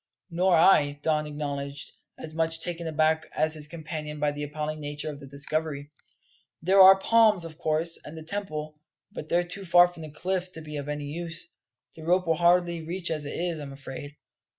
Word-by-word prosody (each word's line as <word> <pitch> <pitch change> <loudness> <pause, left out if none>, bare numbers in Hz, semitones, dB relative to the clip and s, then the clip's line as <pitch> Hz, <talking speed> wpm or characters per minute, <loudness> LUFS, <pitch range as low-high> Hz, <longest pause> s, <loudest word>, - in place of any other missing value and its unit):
"Nor 180 +2 +3
I," 145 -4 +5
Don 150 -1 +1
acknowledged, 140 -1 -5 0.3
as 155 - -8
much 165 0 0
taken 170 0 -3
aback 155 0 +1
as 155 +1 +2
his 150 -1 -2
companion 155 -2 -6
by 150 0 +1
the 145 0 -6
appalling 150 +1 -4
nature 150 +1 -3
of 140 - -10
this 140 -2 -11
discovery. 145 +1 -2 0.7
"There 190 +4 +5
are 190 +1 +10
the 195 - -11
palms, 215 -6 +4
of 160 0 -10
course, 160 +1 -1
and 155 +2 -9
the 160 - -7
temple; 155 -5 -5 0.3
but 155 - -8
they're 175 +1 +3
too 180 +3 -6
far 175 -1 +6
from 175 -2 -12
the 155 - -7
cliff 180 +4 -3
to 160 - -7
be 150 -1 -7
of 145 0 -5
any 150 0 -3
use. 165 +3 -4 0.4
The 160 - -11
rope 180 +3 +2
will 165 - +3
hardly 175 -1 +3
reach 175 +2 -3
as 155 -2 -2
it 145 - -5
is, 170 -2 -2
I'm 140 -2 -7
afraid." 140 +1 -8
160 Hz, 200 wpm, -27 LUFS, 150-175 Hz, 0.7 s, are